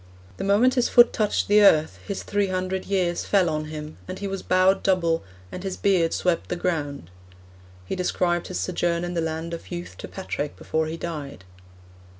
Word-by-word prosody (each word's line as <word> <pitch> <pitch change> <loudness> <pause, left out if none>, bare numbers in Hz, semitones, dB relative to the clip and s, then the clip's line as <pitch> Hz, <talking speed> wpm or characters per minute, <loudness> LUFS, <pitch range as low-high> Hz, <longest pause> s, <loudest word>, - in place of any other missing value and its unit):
The - - -4
moment 210 +6 +4
his 250 -2 +2
foot 240 -1 +6
touched 215 -2 0
the 210 +1 +5
earth 160 -6 +4
his 200 -2 -4
three 205 -1 0
hundred 185 0 -2
years 180 -3 0
fell 185 -5 +2
on 155 0 -2
him, 155 0 -8
and 185 +1 -5
he 200 - -5
was 195 -1 -3
bowed 185 +1 +3
double, 170 -4 +1 0.3
and - - -6
his 190 -1 -4
beard 180 -5 +2
swept 180 -2 0
the - - -1
ground. 145 - -3 0.7
He - - -3
described 175 -1 0
his 185 - -4
sojourn 175 -1 0
in 175 0 -3
the 170 - 0
Land 160 +1 -3
of 165 - -7
Youth 175 -1 -7
to - - -6
Patrick 150 -6 -4
before 160 0 -1
he 160 +1 -4
died.' 150 - -6
180 Hz, 190 wpm, -24 LUFS, 165-195 Hz, 0.7 s, foot